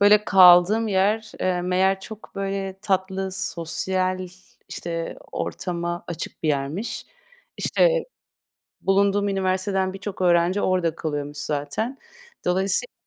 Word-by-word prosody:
böyle, 210 +1 +6
kaldığım 185 +4 +7
yer, 210 +3 +1
eee, 180 -1 0
meğer 190 +2 +2
çok, 220 +2 -11
böyle, 195 -1 -3
tatlı, 190 -1 -1
sosyal, 185 +1 -2 0.4
işte, 165 -1 -4 0.2
ortama 175 -1 -3
açık 170 -1 -6
bir 155 - 0
yermiş. 145 +10 -2 0.5
İşte, - - +2 0.8
bulunduğum 200 +1 +2
üniversiteden 190 0 0
birçok 195 0 -6
öğrenci 175 +2 +3
orada 180 -5 +1
kalıyormuş 145 -3 -4
zaten. 150 - -3 0.5
Dolayısıyla 190 - +1
190 Hz, 105 wpm, -24 LUFS, 175-195 Hz, 0.8 s, kaldığım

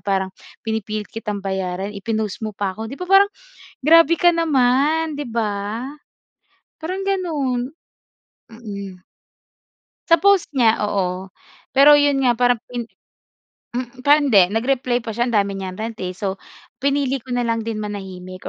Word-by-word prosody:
parang 190 -1 -1 0.3
pinipilit 215 -1 -3
kitang 210 -3 -5
bayaran 190 0 -3
i-pinost 215 0 -3
mo 215 - -6
pa 200 -1 -2
ako", 220 +3 -6
'di 265 - -6
ba, 360 - -5
parang 400 +1 +6 0.5
grabe 330 +3 +6
ka 350 - +6
naman 305 0 +2
'di 295 - -3
ba? 220 +1 -3 0.9
Parang 370 +4 -4
gano'n, 300 -9 -1 0.7
mm, 205 -4 -8 1.2
sa 335 - +7
post 400 +1 +3
niya, 235 -6 +3
oo, 185 -1 -2 0.4
pero 280 +2 +7
yun 285 -1 +3
nga 250 -3 +3
parang 245 0 +2
pin 245 -1 -4 0.9
mm, 245 +1 -6
parang 290 +2 +5
hindi, 195 -8 +5
nag-reply 245 +2 0
pa 225 -2 -6
siya 240 +2 0
ang - - -3
dami 200 -1 0
niyang 190 -1 -6
rant, 225 +1 -4
eh, 180 - -2
so, 190 +1 -3 0.5
pinili 275 -2 0
ko 260 - -13
na 245 -1 0
lang 230 -1 0
din 225 -1 -4
manahimik 190 -3 -7
235 Hz, 150 wpm, -21 LUFS, 200-280 Hz, 1.2 s, sa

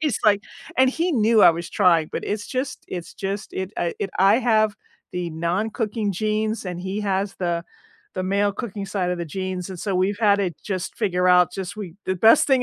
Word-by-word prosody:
he's 300 -8 0
like 205 -1 +4 0.4
and 260 0 +6
he 335 +5 0
knew 225 -3 +4
I - - +9
was 170 +1 -5
trying, 165 -3 +3
but - - -3
it's 205 0 -3
just 260 +1 -4
it's 175 -2 -6
just 195 +1 -4
it 190 +1 -4
I 170 -1 -1
it 195 - -3
I 200 +5 +5
have 215 -4 +2 0.4
the 175 -1 -3
non-cooking 205 +6 -1
genes, 215 +2 -1
and 180 -1 -5
he 190 +3 -3
has 195 -1 -1
the 170 -1 -1 0.5
the 185 - -2
male 200 +2 +1
cooking 200 -3 -5
side 190 -3 -1
of 180 - -2
the 170 - -2
genes, 185 +2 -4
and 185 - -7
so 200 -3 -2
we've 200 +3 +1
had 205 -2 +5
to 195 -3 0
just 190 -2 -4
figure 185 -4 +1
out, 180 -1 +5
just 190 0 -5
we 190 -6 -7
the 185 - +1
best 220 - +6
thing 265 -3 +3
195 Hz, 215 wpm, -23 LUFS, 180-215 Hz, 0.5 s, I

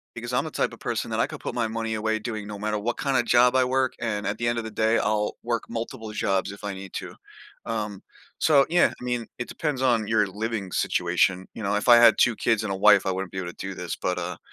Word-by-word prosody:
because - - -6
I'm - - +1
the - - -6
type - - -1
of - - -12
person - - -3
that - - -1
I - - +2
could - - -8
put - - -5
my 120 -2 0
money 115 0 -3
away 110 0 -1
doing 110 -2 -5
no 105 -1 -6
matter 105 +1 -1
what 120 +3 -2
kinda 135 -4 +1
job 120 +2 +4
I 130 -1 +4
work, 130 0 +1
and 105 -3 -2
at 100 +2 -2
the 120 - -1
end 120 - 0
of 115 - -4
the 110 - -6
day 110 +2 +2
I'll 105 -1 0
work 120 -1 -2
multiple 115 -1 -5
jobs 100 -1 0
if 100 - -12
I 100 -1 -3
need 95 -1 -9
to. - - -6 0.5
Um, 105 -3 -3 0.4
so, 140 -3 +5
yeah, 175 +1 +4
I - - -10
mean, 120 -2 -2
it 120 - -4
depends 150 -5 -3
on 120 -5 +2
your 110 -1 +3
living 105 -1 -4
situation, 90 +2 +1
you 115 - -7
know, 100 +1 0
if 105 - -2
I 120 -1 +9
had 120 -1 +7
2 120 -3 +4
kids 110 -2 +1
and 105 - -3
a - - -2
wife, 100 0 +5
I 95 - +1
wouldn't 95 -1 -4
be - - -8
able 90 -2 -4
to - - -9
do 95 0 -5
this, 90 -2 -5
but, 90 - -2
uh 90 0 -4
110 Hz, 275 wpm, -25 LUFS, 100-120 Hz, 0.5 s, I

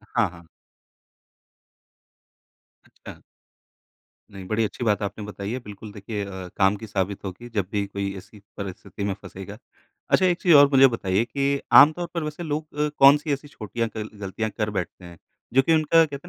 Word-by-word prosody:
हाँ, 115 -3 +3
हाँ। 85 0 -15 2.4
अच्छा। - - -13 1.1
नहीं, 95 -1 -9
बड़ी 110 +3 0
अच्छी 110 +3 -4
बात 105 -3 +1
आपने 100 +1 -5
बताई 100 0 -6
है। 125 - -3
बिल्कुल 105 -2 -10
देखिए 105 0 -5
अ, 95 -2 -7
काम 95 +1 +4
की 110 - -9
साबित 100 -1 -2
होगी 100 +6 -7
जब 105 -5 -2
भी 100 -1 -1
कोई 100 0 -4
ऐसी 100 +3 -13 0.2
परिस्थिति 100 0 -7
में 100 -1 0
फँसेगा। 95 +2 -9 0.5
अच्छा 185 - +4
एक 180 0 +1
चीज़ 175 -3 +5
और 145 -1 +8
मुझे 135 0 +8
बताइए 95 +1 0
कि 140 +3 -1
आम 145 +2 +9
तौर 175 +2 -5
पर 170 - -2
वैसे 150 +2 -5
लोग 155 -1 -4
अ, 150 0 +2
कौन-सी 145 +2 +6
ऐसी 140 +1 -4
छोटीयाँ 115 -2 -4
क 110 0 -4
गलतियाँ 105 +3 -3
कर 105 0 -2
बैठते 95 -2 -5
हैं, 85 -1 -12 0.4
जो 135 - +6
कि 165 +4 +3
उनका 160 +1 +4
कहते 145 +2 -8
110 Hz, 180 wpm, -24 LUFS, 100-140 Hz, 2.4 s, आम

